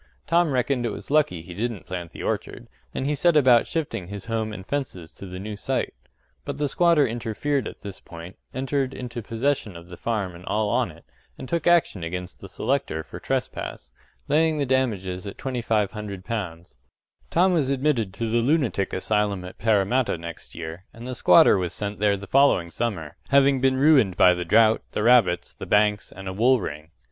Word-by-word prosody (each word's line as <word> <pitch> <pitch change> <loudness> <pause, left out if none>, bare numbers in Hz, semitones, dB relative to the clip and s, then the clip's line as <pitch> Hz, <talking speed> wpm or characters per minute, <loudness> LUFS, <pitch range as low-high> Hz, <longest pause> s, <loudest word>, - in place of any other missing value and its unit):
Tom 170 -1 +3
reckoned 130 -1 0
it 120 - 0
was - - -8
lucky 140 - +2
he 90 +1 -9
didn't 110 +1 -3
plant 90 -2 -5
the - - -9
orchard, - - -3 0.2
and 130 - -3
he 145 - +1
set 160 +2 +3
about 125 -5 +5
shifting 145 - -3
his 100 +1 -7
home 110 -1 -2
and 95 -3 -8
fences 100 - -4
to 100 - -10
the 90 0 -7
new 105 +3 -6
site. 100 - -2 0.5
But - - -5
the 145 - 0
squatter 170 -1 +4
interfered 120 +3 -2
at - - -10
this 100 -2 -8
point, 85 +2 -11 0.2
entered 135 0 -2
into 120 -1 -6
possession 115 -2 -1
of 85 +1 -11
the 90 - -9
farm 105 -6 -2
and 85 +1 -12
all 105 0 0
on - - +1
it, - - -15 0.3
and - - -8
took 170 +2 -1
action 170 - +3
against 90 +2 -5
the 95 - -10
selector 90 - -1
for - - -10
trespass - - -4 0.3
laying 155 +2 +2
the 145 - 0
damages 105 -8 -1
at 100 - -7
L2500. 105 - -3 0.5
Tom 180 +2 +3
was 150 -6 +1
admitted 135 -7 +1
to 115 - -2
the 115 +2 +1
lunatic 125 - +1
asylum 100 -1 0
at 90 - -11
Parramatta 110 +1 +2
next 85 0 -9
year, 85 +3 -7
and 115 +1 -11
the 130 - -4
squatter 95 -3 +6
was 90 -2 -2
sent 105 -1 -4
there 100 -1 +2
the 100 - -9
following 115 -10 +3
summer, 95 -11 -3
having 140 -1 +4
been 130 0 +3
ruined 135 - +4
by 90 - +7
the 90 0 -3
drought, 110 +5 +4
the 105 - -1
rabbits, 110 -8 +4
the - - -9
banks, 105 0 +2
and 95 +1 -9
a 95 - -3
wool 120 +6 +4
ring. 75 -4 -6
110 Hz, 190 wpm, -24 LUFS, 95-135 Hz, 0.5 s, by